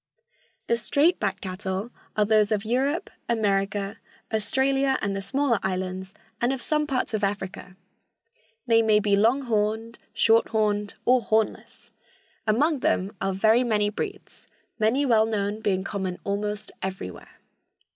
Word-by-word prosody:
The 235 - +1
straight 290 +10 +2
backed - - -2
cattle 190 +3 -4 0.3
are 210 - +4
those 215 0 +3
of 210 -1 0
Europe, 270 +8 0 0.2
America, 200 -2 0 0.3
Australia 265 +5 +2
and 200 -1 -2
the 195 - -3
smaller 240 +3 +1
islands, 185 0 -3 0.3
and 240 +2 +2
of 270 - -2
some 300 +3 0
parts 255 -4 -1
of 215 -1 -1
Africa. 195 -2 -3 0.9
They 230 -2 +4
may 215 -1 +4
be 205 -1 +2
long 230 +7 +3
horned, 220 0 -1
short 225 0 +4
horned 210 -2 0
or 250 0 +5
hornless. 220 -1 -2 0.6
Among 285 +8 +2
them 200 -4 0
are 195 - 0
very 220 +5 +3
many 210 -3 +1
breeds, 400 - -7 0.3
many 235 +7 +2
well 220 -4 +4
known 210 -1 -1
being 190 -3 0
common 190 -2 -3
almost 205 +1 -3
everywhere. 190 - -6
215 Hz, 140 wpm, -25 LUFS, 200-240 Hz, 0.9 s, or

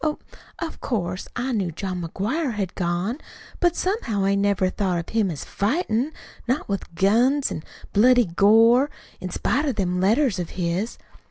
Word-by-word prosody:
Oh, 305 -1 0 0.4
of 335 -2 -6
course, 185 -6 -2
I 250 +2 -2
knew 195 -7 -1
John 185 +2 -4
McGuire 230 - -2
had 195 -4 -3
gone; 180 - -1 0.4
but 350 -1 +2
somehow 235 - -1
I 195 - +3
never 200 -1 +2
thought 185 -4 0
of 170 - -5
him 220 -4 +1
as 155 -5 -5
fightin' 245 - 0 0.4
not 255 +5 0
with 195 -4 -4
guns 240 - +3
an' - - -4 0.3
bloody 245 +3 +5
gore, 225 - +5 0.3
in 185 - -5
spite 270 - 0
of 275 -5 0
them 180 -3 0
letters 220 +1 +2
of 175 - -4
his. 180 +5 -1
205 Hz, 165 wpm, -24 LUFS, 185-255 Hz, 0.4 s, bloody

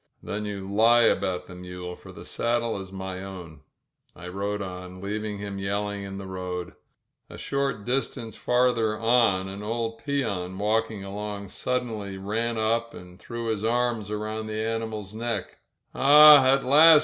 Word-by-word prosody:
"Then 105 +1 -4
you 100 -2 -5
lie 115 +4 +5
about 95 -5 +1
the - - -11
mule, 90 0 -7
for - - -13
the - - -11
saddle 115 -2 -1
is 95 -1 -8
my 95 -1 -5
own." 90 -6 -9 0.5
I 90 0 -8
rode 100 +2 -3
on, 90 -1 -8
leaving 105 +1 -3
him 100 -1 -5
yelling 100 +1 -2
in 95 0 -6
the 100 - -7
road. 90 -1 -5 0.6
A - - -10
short 140 -7 -2
distance 120 -4 -2
farther 120 -3 +2
on 115 -5 +3
an 100 +1 -7
old 115 +1 -3
peon 100 -11 -2
walking 110 0 0
along 100 0 -5
suddenly 110 -6 -3
ran 110 +4 -2
up 115 +1 0
and 90 +1 -12
threw 115 -1 -6
his 110 -2 -1
arms 115 -2 0
around 110 +1 -3
the 110 0 -3
ani 115 0 -1
mal's 105 -3 -7
neck. 115 +1 -4 0.3
"Ah, 150 0 +9
at 135 0 +2
last 155 +4 +8
105 Hz, 160 wpm, -26 LUFS, 95-115 Hz, 0.6 s, Ah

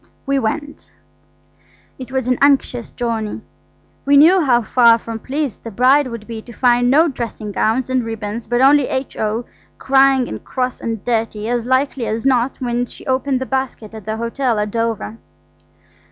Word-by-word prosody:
We 275 -1 +1
went. 290 +5 -4 1.1
It 255 0 -8
was 260 -2 -2
an 250 -1 +1
anxious 270 -4 +2
journey. 225 - -3 0.6
We 280 0 +4
knew 345 +6 +6
how 240 -4 +3
far 235 0 +5
from 230 -1 -7
pleased 275 0 -4
the 230 - -6
bride 255 +6 +3
would 230 -3 -7
be 225 -1 -7
to 235 - -13
find 245 0 +3
no 310 +6 +5
dressing 235 -6 -5
gowns 225 +5 0
and 255 -1 0
ribbons, 225 0 -5
but 240 +2 +1
only 280 0 +5
H.O. 230 -3 -3 0.3
crying 270 -1 +3
and - - -7
cross 255 -1 -3
and 225 -3 -4
dirty, 225 -2 -1
as 240 0 -1
likely 260 -1 0
as 225 +3 -3
not, 255 -1 +1
when 245 -1 -1
she - - -14
opened 260 0 0
the 260 - -3
basket 260 -5 -4
at 220 -2 -10
the 220 0 -3
hotel 235 +1 -1
at 210 0 -2
Dover. 230 -1 -3
245 Hz, 170 wpm, -18 LUFS, 225-265 Hz, 1.1 s, knew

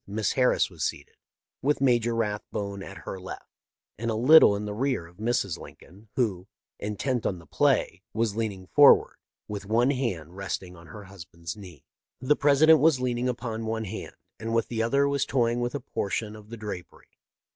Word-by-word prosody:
Miss 105 +1 -1
Harris 130 -1 +3
was - - -5
seated, - - -4 0.5
with 145 +2 +1
Major 120 -3 +2
Rathbone 105 -2 -3
at 100 +1 -10
her 95 - -5
left, 95 - -8 0.5
and 115 +1 -2
a 110 - 0
little 125 -1 +7
in 105 +1 -4
the 105 - -4
rear 125 -5 -1
of 85 +1 -18
Mrs. 110 -6 -1
Lincoln, 100 +5 -14
who, 100 -8 -1 0.3
intent 110 +4 -2
on 95 - -1
the 85 - -14
play, 80 +3 +1
was 110 -2 -1
leaning 105 -5 -3
forward, 145 +9 +6 0.3
with 100 -1 -6
one 120 +5 +3
hand 95 - -3
resting 95 -1 -5
on 85 -1 -15
her 105 +7 -10
husband's 85 -3 -9
knee. 90 -9 -13 0.3
The 130 +4 +2
President 150 +3 +5
was 155 -4 +4
leaning 125 0 -1
upon 115 -2 -4
one 110 0 -2
hand, 110 +2 -7 0.2
and 115 +1 -3
with 115 - +1
the 115 -2 -1
other 140 +5 +2
was 140 -1 +1
toying 120 -2 +1
with 120 +3 -2
a - - -1
portion 105 0 -3
of 105 0 -14
the 115 - -7
drapery. 105 -5 -9
110 Hz, 185 wpm, -27 LUFS, 100-125 Hz, 0.5 s, little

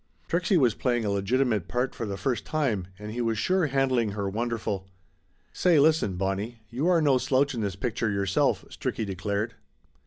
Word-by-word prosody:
Trixie 180 +2 +2
was 125 -8 +4
playing 120 -1 0
a 100 - 0
legitimate 105 0 +1
part 125 +5 -1
for 115 - -4
the 100 -1 -4
first 120 +6 -1
time, 120 - -1
and 105 +1 -7
he 120 +2 -3
was 115 -2 0
sure 185 - +2
handling 130 -6 +1
her 100 -1 -2
wonderful. 105 -2 -2 0.7
"Say 175 -4 +4
listen, 150 - +3
Bonnie, 100 +5 -3
you 135 +8 -1
are 170 -3 +4
no 135 -3 +4
slouch 135 +2 +2
in 115 - -3
this 100 -3 -2
pic 110 +3 -2
ture 115 - +1
yourself 100 -2 +1
!" - - -23
Stricky 110 - -3
declared. 100 +3 -2
115 Hz, 190 wpm, -27 LUFS, 100-135 Hz, 0.7 s, was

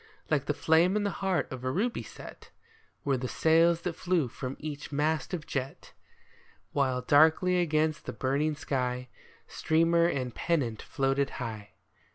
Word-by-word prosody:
Like 140 -3 +2
the 145 - -1
flame 165 +6 +3
in 210 - +1
the 200 - 0
heart 190 -2 +1
of 130 -1 -6
a 130 - -1
ruby 220 - -1
set - - -12 0.6
Were 135 -2 +2
the 125 +1 -3
sails 165 +6 +3
that 180 - -3
flew 175 -6 0
from 130 +2 -6
each 150 -1 -7
mast 150 +2 0
of 170 -5 -4
jet; 135 0 -5 0.8
While 130 -3 0
darkly 160 +6 +4
against 155 -1 0
the - - -2
burning 145 +4 0
sky 125 -4 -2 0.4
Streamer 165 +1 +2
and 130 -7 -2
pennant 130 -10 -1
floated 135 0 0
high. 110 -3 -6
150 Hz, 155 wpm, -29 LUFS, 130-170 Hz, 0.8 s, darkly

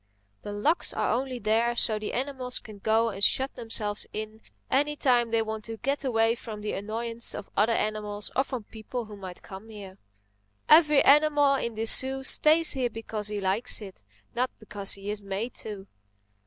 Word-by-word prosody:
The 205 - -7
locks 250 +12 +1
are - - 0
only 255 +1 -2
there 230 +2 +1
so 215 -2 +2
the 210 - -5
animals 255 -1 -3
can 215 -2 -10
go 225 +3 +2
and 200 -2 -5
shut 265 +6 +2
themselves 215 -3 -3
in 215 +1 -7 0.3
any 290 +3 +1
time 245 -5 +2
they 225 0 +1
want 220 0 -6
to 225 0 -6
get 275 +5 -2
away 225 -3 +2
from 220 -3 -8
the 210 - -4
annoyance 230 +3 0
of 200 - -9
other 220 +3 +2
animals 210 -1 -3
or 265 - +3
from 255 -5 -6
people 225 +3 -7
who 210 -1 -11
might 185 -3 -10
come 195 +3 -11
here. 200 -3 -11 0.7
Every 300 -2 +6
animal 290 -1 +4
in 235 -4 -2
this 220 +1 +7
zoo 265 0 +2
stays 310 +4 +5
here 255 -3 0
because 220 -2 -5
he 210 -1 -4
likes 195 +4 0
it, 195 - -11 0.3
not 250 +2 0
because 205 -2 -1
he 200 +1 -4
is 210 0 -2
made 200 +4 -4
to." 205 -3 -7
225 Hz, 185 wpm, -27 LUFS, 210-255 Hz, 0.7 s, this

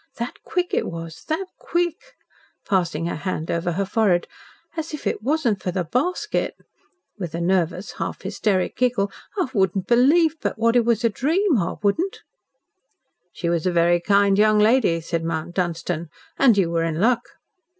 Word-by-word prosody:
That 235 +1 -4
quick 360 0 -2
it - - +1
was 165 -1 -7
that 320 +5 -1
quick," 350 +9 -2 0.5
passing 170 -5 0
her 170 - -2
hand 160 0 -3
over 170 +1 -1
her 195 +3 -1
forehead, 195 -4 +2 0.5
"as 320 -1 -4
if 300 - -11
it - - -1
wasn't 245 -6 0
for - - -2
the 180 0 -1
basket," 325 - -1 0.6
with 175 -4 -4
a - - -2
nervous, 180 +1 0
half - - -4
hysteric 195 -1 0
giggle, 240 -6 +1 0.3
"I 365 -9 0
wouldn't 190 -3 +1
believe 300 - +4
but - - -2
what 230 +1 +2
it 240 -2 +4
was 235 0 +1
a 230 - +4
dream 310 - +1
I 170 - -2
wouldn't." 330 - 0 1.1
"She 175 - -4
was 170 0 0
a - - +2
very 175 0 +3
kind 200 +1 +3
young 215 0 +5
lady," 210 -6 +3
said 165 0 -2
Mount 165 +1 -3
Dunstan, 170 -2 -2 0.3
"and 240 -6 +5
you 175 -4 +2
were 165 -1 +1
in 165 -1 -2
luck." 235 +4 +3
200 Hz, 170 wpm, -23 LUFS, 170-250 Hz, 1.1 s, young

